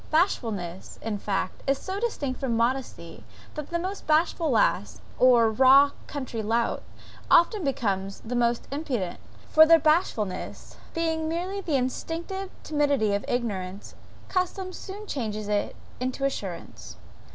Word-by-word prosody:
Bashfulness, 220 - -1
in 215 -2 -2
fact, 195 -2 -2
is 275 0 +3
so 380 +6 -4
distinct 290 - -2
from 245 -5 0
modesty, 235 -8 -2 0.3
that 300 -2 -6
the 340 - 0
most 375 +4 -5
bashful 320 +1 +2
lass, 110 - +2 0.2
or 240 -3 +6
raw 270 +5 +7 0.2
country 260 -5 -4
lout, 230 +2 0 0.5
often 370 +3 +5
becomes 200 -8 -1
the 240 +2 -4
most 240 -1 +1
impudent; 260 - -3 0.3
for 315 - +9
their 330 +1 +8
bashfulness 195 - 0 0.2
being 320 -1 0
merely 365 +4 -2
the 325 -6 -1
instinctive 335 +9 -3
timidity 285 -8 +1
of 200 - 0
ignorance, 200 -5 -3 0.3
custom 370 0 -2
soon 400 +3 -8
changes 215 - -3
it 205 -1 -1 0.2
into 255 +2 -2
assurance. 195 -10 -5
260 Hz, 130 wpm, -26 LUFS, 215-325 Hz, 0.5 s, for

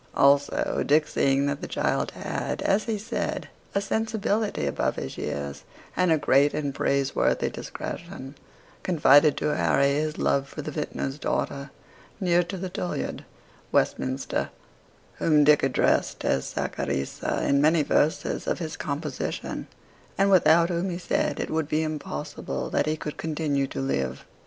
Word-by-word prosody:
Also, 140 +1 +3
Dick 150 +1 +3
seeing 135 0 +2
that 140 0 -2
the - - -4
child - - 0
had, - - -3
as 200 +2 +2
he 225 -2 -1
said, 205 - -3 0.3
a - - +4
sensibility 220 - -1
above 70 - 0
his 65 - -5
years, 70 -1 -4 0.3
and 180 -2 +2
a 160 - +5
great 145 0 +3
and 145 -2 -2
praiseworthy 140 0 +1
discretion, 170 -6 -7 0.5
confided 150 -4 +5
to 150 - 0
Harry 140 0 +3
his 155 +1 -1
love 140 0 +1
for 150 - -6
a - - -10
vintner's 150 -2 -4
daughter, 140 -1 -2 0.5
near 175 -3 +3
to 180 +2 -5
the 185 +1 -4
Tollyard, 180 0 -4 0.5
Westminster, 130 +1 0 0.7
whom 150 -2 +4
Dick 150 0 +6
addressed 135 -2 +1
as 65 - 0
Saccharissa 70 0 -2
in 140 0 +3
many 155 +1 +4
verses 150 +2 +1
of - - 0
his 160 -3 -4
composition, 145 +2 -4 0.5
and 195 0 +3
without 170 -2 +5
whom 175 +2 -1
he 175 - -3
said 180 - -1
it - - -3
would 160 -1 -1
be 155 +1 +1
impossible 150 - -4
that - - +1
he 155 0 0
could 150 -1 -6
continue 150 -3 -1
to 70 - -6
live. 65 -1 -2
150 Hz, 150 wpm, -26 LUFS, 140-170 Hz, 0.7 s, Dick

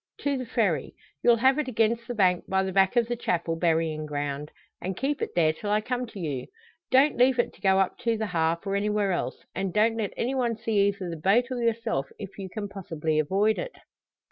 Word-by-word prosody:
"To 285 -1 0
the 255 -2 -4
Ferry; 215 -9 0 0.3
you'll 240 - +5
have 260 +5 +3
it 300 - -1
against 230 -1 +1
the 245 - -4
bank 185 -4 +2
by 190 0 +2
the 190 - -2
back 190 +4 +3
of 235 -2 +3
the 240 - -1
Chapel 170 -7 -1
burying 160 -2 0
ground, 145 0 -3 0.3
and 185 0 -4
keep 280 +2 -1
it - - -3
there 160 -2 +3
till 205 +6 -6
I 210 +1 +3
come 250 +3 -3
to 215 - -10
you. 145 -7 -3 0.4
Don't 270 +3 +4
leave 255 +1 +4
it 240 - +1
to - - -21
go 190 -1 +4
up 195 -1 +1
to 230 -2 0
the 220 - -1
`Harp,' 170 -2 0
or 195 0 -1
anywhere 205 -1 +1
else; 175 - -3
and 190 -1 -2
don't 225 +4 +2
let 210 -3 -2
any 250 +3 -1
one 240 -4 0
see 210 -3 +2
either 200 -2 -2
the 165 -1 -5
boat 225 +10 +2
or 250 -1 -2
yourself, 230 -12 0
if 200 -1 -9
you 190 -1 -5
can 205 +1 -5
possibly 165 -6 -2
avoid 200 +8 +2
it. - - -5
200 Hz, 230 wpm, -27 LUFS, 175-235 Hz, 0.4 s, you'll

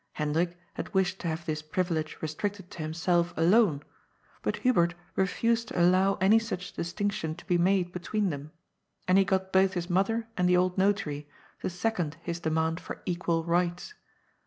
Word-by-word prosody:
Hendrik 165 +4 -1 0.2
had - - -6
wished 190 0 +1
to - - -4
have 165 +1 -3
this 155 -1 -2
privilege 160 0 -2
restricted 190 +4 -4
to 170 - -7
himself 170 +2 0
alone, 170 -3 +4 0.6
but - - -1
Hubert 175 -9 +3 0.2
refused 230 +4 +1
to - - -3
allow 185 +3 +4
any 205 +4 +5
such 210 -5 -5
distinction 175 -3 -2
to 175 - -14
be 175 -1 +2
made 180 0 +2
between 185 +2 -1
them, 145 +1 -6 0.6
and 185 +1 +5
he - - +6
got 190 -1 -1
both 190 0 +4
his 175 0 -3
mother 225 +5 +1
and 180 -3 +2
the 180 - +5
old 180 0 +2
notary 190 -7 0 0.3
to - - -1
second 180 -4 -2
his 170 0 -3
demand 160 0 0
for - - -8
equal 170 -2 0
rights. 175 - 0
180 Hz, 170 wpm, -29 LUFS, 165-195 Hz, 0.6 s, he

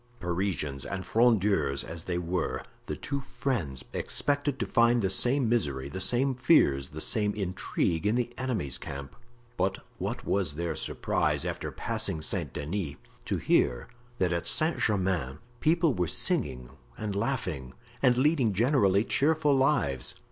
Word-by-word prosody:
Parisians 85 -6 -2
and 95 -1 -4
Frondeurs 100 - +2
as 80 0 -6
they 90 -1 -1
were, 90 0 -2 0.2
the - - -2
two 140 - -3
friends 90 - -3
expected 145 -1 0
to 120 - -1
find 115 0 +3
the 95 - +1
same 125 +5 +2
misery, 70 - 0
the 95 +7 -5
same 125 +8 +2
fears, 120 - +3
the 75 - -8
same 105 +5 +1
intrigue 95 -2 -1
in 105 - +2
the 120 -1 -1
enemy's 110 - -1
camp; 70 0 -7 0.4
but 95 +1 +1 0.2
what - - -3
was 90 -8 0
their 85 +1 -2
surprise, - - 0
after - - -3
passing 80 - -2
Saint 80 - -1
Denis, 75 0 -3 0.3
to - - -1
hear - - +1 0.3
that 90 -4 +1
at 85 - -2
Saint 160 +1 +1
Germain 95 - 0 0.2
people 165 -1 +3
were 90 -5 0
singing 65 -4 -1 0.3
and 105 -2 -3
laughing, 95 - -2 0.3
and 125 -2 +4
leading 130 -5 +3
generally 105 -3 +3
cheerful 150 +3 +2
lives. 130 - +1
95 Hz, 150 wpm, -29 LUFS, 80-125 Hz, 0.4 s, and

